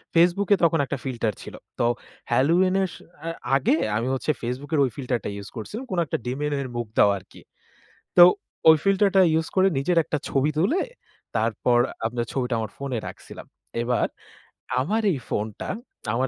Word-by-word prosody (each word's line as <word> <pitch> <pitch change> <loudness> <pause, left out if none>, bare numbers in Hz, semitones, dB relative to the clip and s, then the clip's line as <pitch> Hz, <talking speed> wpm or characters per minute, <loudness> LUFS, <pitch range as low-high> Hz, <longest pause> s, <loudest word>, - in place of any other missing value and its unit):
Facebook 175 +4 +4
এ - - +4
তখন 165 -1 +4
একটা 140 - -3
filter 120 -5 -1
ছিল। - - -9 0.2
তো 120 - +3 0.5
halloween 175 +7 +3
এর 190 - +1
স - - -10 0.3
আ - - -2 0.3
আগে 140 +2 +3 0.2
আমি 120 +3 -1
হচ্ছে 135 +3 0
Facebook 125 +6 -4
এর 150 - +3
ঐ - - +4
ফিল্টার 125 -3 -1
টা - - -1
ইউজ 100 -1 -7
করছিলাম 210 - -6
কোনো 175 -2 +1
একটা - - -2
demon 145 +4 -2
এর 130 - -4
মুখ 120 -2 -2
দেওয়া 100 - +6
আরকি। - - -17 0.8
তো 175 - +12 0.5
ওই 160 - +9
ফিল্টারটা 195 -1 +4
ইউজ 160 0 +1
করে 190 0 +5
নিজের 170 +6 +1
একটা 150 - -2
ছবি 140 +2 +2
তুলে, 225 - +2 0.5
তারপর 115 +2 +2 0.3
আপনার 120 +1 -1
ছবিটা 125 -2 -1
আমার 110 - -4
ফোনে 135 -3 -3
রাখছিলাম। - - -10 0.4
এবার 120 0 +1 0.7
আমার 210 +12 0
এই 140 - -2
ফোনটা 105 0 -3 0.4
আমার 130 +3 +1
140 Hz, 175 wpm, -24 LUFS, 120-175 Hz, 0.8 s, তো